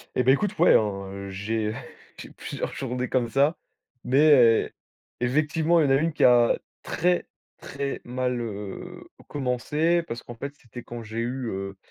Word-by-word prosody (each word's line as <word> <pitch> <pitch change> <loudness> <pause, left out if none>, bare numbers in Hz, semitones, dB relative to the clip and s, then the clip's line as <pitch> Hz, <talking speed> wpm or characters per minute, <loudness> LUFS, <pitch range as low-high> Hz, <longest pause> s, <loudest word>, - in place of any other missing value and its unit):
Et 125 - +2
beh, 130 +2 +6
écoute, 205 +6 -1
ouais, - - +6
hein, 100 -1 -4
j'ai 105 +2 -2 0.4
j'ai - - -10
plusieurs - - -5
journées 125 -1 -3
comme 120 -3 0
ça, 140 +6 +2 0.5
mais 145 +5 +4
heu, 120 -5 +5 0.5
effectivement, 155 +6 +2
il 145 -3 +3
y - - +4
a - - +6
1 160 +3 +1
qui - - 0
a 120 -1 +5 0.2
très, 180 0 0 0.3
très 140 0 -5
mal, 125 0 -2
heu, 105 -3 -7 0.2
commencé, 150 +6 0
parce 120 -6 -7
qu'en 120 - -9
fait, 140 +4 -7
c'était 120 -2 -11
quand 120 -1 -8
j'ai 110 +1 -6
eu, 125 +1 -3
heu, 95 0 -5
125 Hz, 165 wpm, -25 LUFS, 115-145 Hz, 0.5 s, beh